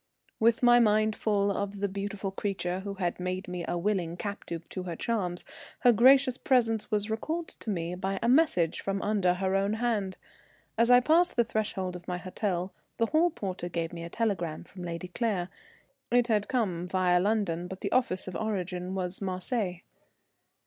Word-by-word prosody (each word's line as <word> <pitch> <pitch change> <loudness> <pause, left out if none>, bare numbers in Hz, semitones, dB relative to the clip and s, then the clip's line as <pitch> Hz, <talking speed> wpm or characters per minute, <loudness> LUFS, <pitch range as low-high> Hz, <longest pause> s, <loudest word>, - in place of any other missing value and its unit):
With 230 +2 +3
my 240 0 +7
mind 215 -1 +3
full 200 -2 +1
of 200 0 -3
the 200 - +1
beautiful 200 0 -4
creature 190 -2 -2
who 200 +1 -5
had 180 -2 -2
made 185 +1 -3
me 180 -1 -4
a 175 - -1
willing 175 -2 -1
captive 175 -5 -5
to 185 - -5
her 175 -2 -5
charms, 180 -4 -2 0.4
her 245 - +7
gracious 255 +2 +5
presence 225 -4 +2
was 210 -1 0
recalled 320 +9 -2
to - - -9
me 170 -3 -2
by 190 +2 -2
a 235 - -1
message 245 - +3
from 195 0 -2
under 195 -4 +2
her 190 +1 -1
own 195 +2 +1
hand. 220 -5 -1 0.6
As 230 +1 +3
I 245 0 +8
passed 335 +6 +3
the 235 - +4
threshold 205 -5 -2
of 175 -1 -10
my 180 -1 -2
hotel, 185 0 -3 0.2
the 230 - +3
hall 315 +8 +3
porter 185 - -5
gave 165 0 -3
me 170 -1 -6
a 170 - -6
telegram 175 -7 -2
from 185 - -12
Lady 170 0 -5
Claire. 190 -3 -1 0.6
It 245 0 +4
had 210 -2 +2
come 185 -9 -1
via 180 -1 +3
London, 185 -4 0
but 190 +1 -8
the - - -2
office 215 -8 +1
of 185 - -6
origin 185 -3 -3
was 185 0 -3
Marseilles. 185 0 -1
195 Hz, 185 wpm, -29 LUFS, 180-225 Hz, 0.6 s, I